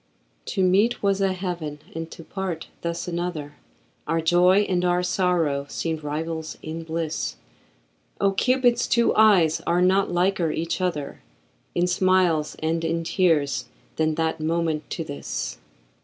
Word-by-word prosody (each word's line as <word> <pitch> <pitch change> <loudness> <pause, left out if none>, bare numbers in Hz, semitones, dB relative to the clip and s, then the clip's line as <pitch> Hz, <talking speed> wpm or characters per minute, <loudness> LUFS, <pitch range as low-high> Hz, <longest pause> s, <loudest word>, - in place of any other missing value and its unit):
To 190 - 0
meet 200 +7 +3
was 200 0 +2
a 195 -1 +2
heaven 175 -5 -4 0.2
and 165 0 -5
to 165 - -10
part 185 -2 -5
thus 170 +1 -3
another, 170 -4 -4 0.5
Our 165 +2 +1
joy 180 +4 +4
and 185 -3 0
our 180 0 +2
sorrow 175 -6 +1
seemed 160 -2 -3
rivals 160 +2 -4
in 160 +1 -5
bliss; 165 -1 -3 0.8
Oh! 200 - +3
Cupid's 245 +3 +2
two 235 0 +3
eyes 190 -8 +5
are 175 +1 +3
not 190 +2 +3
liker 175 -1 +1
each 170 +4 -2
other 160 -6 -2 0.5
In 175 - +2
smiles 180 -4 +2
and 165 +1 0
in 165 0 -1
tears 165 -5 +1 0.3
than 155 -1 +1
that 160 0 -1
moment 160 -1 -1
to 165 - -3
this. 145 -2 -5
170 Hz, 140 wpm, -24 LUFS, 160-185 Hz, 0.8 s, eyes